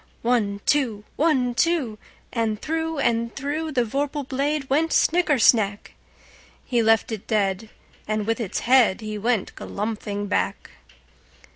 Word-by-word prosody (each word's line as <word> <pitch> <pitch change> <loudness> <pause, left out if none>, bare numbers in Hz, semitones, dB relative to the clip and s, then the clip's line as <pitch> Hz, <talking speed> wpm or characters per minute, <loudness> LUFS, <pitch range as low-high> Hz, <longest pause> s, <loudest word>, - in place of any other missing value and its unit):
One, 215 -4 +1
two! 240 -8 +1
One, 265 -6 +2
two! 265 -7 0 0.3
And 225 -3 -1
through 320 +2 -2
and 235 -3 0
throughThe 285 -2 -1
vorpal 280 +3 -2
blade 280 +1 -1
went 315 +5 +1
snicker 335 -4 +3
snack! 210 -4 +3 0.7
He 240 -3 +1
left 225 0 +3
it 215 -3 -6
dead, 205 0 0 0.4
and 215 -1 -1
with 225 +2 -1
its 220 -6 -3
headHe 215 -4 +2
went 230 -3 0
galumphing 205 -1 -4
back. 90 - -2
235 Hz, 125 wpm, -24 LUFS, 215-285 Hz, 0.7 s, snicker